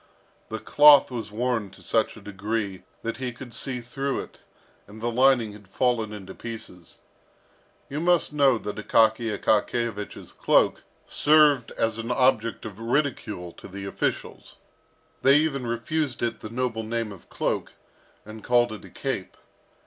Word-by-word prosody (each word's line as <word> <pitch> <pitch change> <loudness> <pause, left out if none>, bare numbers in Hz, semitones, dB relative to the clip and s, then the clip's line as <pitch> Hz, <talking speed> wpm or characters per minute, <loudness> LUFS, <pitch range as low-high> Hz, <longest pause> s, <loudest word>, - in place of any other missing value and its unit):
The 110 - -3
cloth 145 +5 +6
was 115 -4 -5
worn 115 -2 -1
to 95 - -17
such 110 0 0
a - - -12
degree 100 -1 -3 0.2
that 115 0 -3
he 125 -1 -3
could 120 0 -11
see 125 +2 -4
through 135 +3 -3
it, - - -13 0.5
and 105 +2 -12
the 120 +2 -1
lining 125 -2 +4
had 105 -1 -14
fallen 115 +1 0
into 95 -3 -8
pieces. 110 -7 -9 0.9
You 145 - -4
must 175 -2 +2
know 140 -4 +4
that 105 -1 -6
Akaky 110 +2 +3
Akakiyevich's 110 -1 -1
cloak - - +3 0.2
served 145 -5 +4
as 115 0 -1
an 115 +1 -4
object 125 -3 +2
of 105 -2 -8
ridicule 115 - -1
to - - -12
the 95 +1 -7
officials. 100 - -3 0.7
They 135 +1 +6
even 140 -5 0
refused 120 +3 -2
it 115 -1 -1
the 110 - -8
noble 120 -1 -2
name 115 0 -3
of 95 -4 -13
cloak, - - -2 0.5
and 110 0 -10
called 120 -1 +3
it 110 - -8
a - - -12
cape. - - -4
115 Hz, 155 wpm, -25 LUFS, 110-130 Hz, 0.9 s, cloth